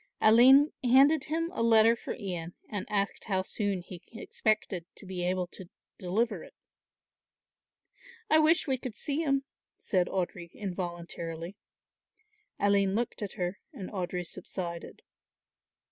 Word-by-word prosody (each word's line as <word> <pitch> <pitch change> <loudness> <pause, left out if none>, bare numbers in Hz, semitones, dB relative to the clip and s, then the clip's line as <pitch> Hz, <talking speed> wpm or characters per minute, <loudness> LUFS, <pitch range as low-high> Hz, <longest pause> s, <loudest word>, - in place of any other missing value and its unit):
Aline 260 +7 +7
handed 270 +4 +5
him 330 +2 -1
a - - -2
letter 230 0 +6
for - - -6
Ian 175 -5 -5
and 205 -3 -4
asked 200 -1 -1
how 190 -3 0
soon 200 -2 -2
he 180 -1 -10
expected 215 -5 -1
to - - -12
be 185 -2 -4
able 180 0 0
to 185 -2 -10 0.3
deliver 210 +6 -1
it. - - -15 1.7
"I 315 -6 +5
wish 315 +2 +4
we 265 -4 0
could 245 -4 -6
see 290 +7 -1
him," 275 -3 +1 0.3
said 180 -3 0
Audry 175 -2 -3
involuntarily. 175 -2 -5 1.0
Aline 200 -1 +3
looked 235 0 -2
at 205 -2 -4
her 180 0 -3
and 190 - -7
Audry 180 -3 -3
subsided. 170 -1 -6
200 Hz, 130 wpm, -30 LUFS, 180-240 Hz, 1.7 s, Aline